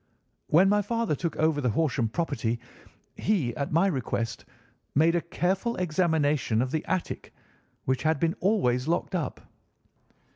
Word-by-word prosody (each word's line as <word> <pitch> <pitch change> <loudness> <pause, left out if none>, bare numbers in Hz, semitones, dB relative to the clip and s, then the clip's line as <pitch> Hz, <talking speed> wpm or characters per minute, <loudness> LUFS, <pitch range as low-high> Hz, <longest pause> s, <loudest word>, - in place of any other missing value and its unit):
"When 175 +5 +5
my 205 +1 +4
father 230 -2 -1
took 165 +1 -3
over 155 -2 +2
the 125 - +1
Horsham 130 -2 +1
property, 130 -6 -1 0.6
he, 160 - 0
at 140 - -3
my 165 +4 +4
request, 115 - -2 0.5
made 160 +4 +4
a 175 - +1
careful 190 +7 -1
examination 155 -8 +1
of 130 - -4
the 155 0 -1
attic, 185 - -3 0.5
which 130 -1 0
had 155 -2 +1
been 165 +2 +2
always 140 - +1
locked 170 +3 0
up. 175 -4 -2
160 Hz, 145 wpm, -27 LUFS, 130-180 Hz, 0.6 s, When